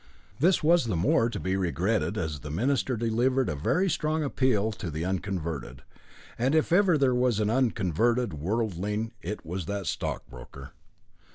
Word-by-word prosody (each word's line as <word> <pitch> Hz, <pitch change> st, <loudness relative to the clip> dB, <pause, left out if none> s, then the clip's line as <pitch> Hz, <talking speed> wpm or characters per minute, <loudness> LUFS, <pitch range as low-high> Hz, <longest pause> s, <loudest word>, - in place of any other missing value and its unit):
This 170 Hz, +3 st, +3 dB
was 170 Hz, -2 st, +4 dB
the 110 Hz, -5 st, -1 dB
more 100 Hz, +7 st, +2 dB
to -, -, -5 dB
be 95 Hz, 0 st, -1 dB
regretted, 95 Hz, +4 st, 0 dB
as 80 Hz, -6 st, -3 dB
the 75 Hz, -, -8 dB
minister 125 Hz, -, 0 dB
delivered 120 Hz, +3 st, +1 dB
a 75 Hz, -, -2 dB
very 170 Hz, -, +1 dB
strong 155 Hz, -2 st, 0 dB
appeal 125 Hz, -6 st, +1 dB
to 95 Hz, -4 st, -6 dB
the 80 Hz, +2 st, -3 dB
unconverted, 85 Hz, -9 st, -4 dB, 0.6 s
and 130 Hz, +5 st, +2 dB
if 155 Hz, -, +2 dB
ever 180 Hz, -2 st, +4 dB
there 135 Hz, -3 st, +3 dB
was 125 Hz, -3 st, +2 dB
an 105 Hz, 0 st, +1 dB
unconverted 115 Hz, -2 st, +1 dB
worldling, 105 Hz, +5 st, -2 dB
it 105 Hz, +5 st, -5 dB
was 90 Hz, +1 st, -4 dB
that 100 Hz, -1 st, -3 dB
stockbroker. 60 Hz, -5 st, -6 dB
110 Hz, 160 wpm, -27 LUFS, 90-130 Hz, 0.6 s, was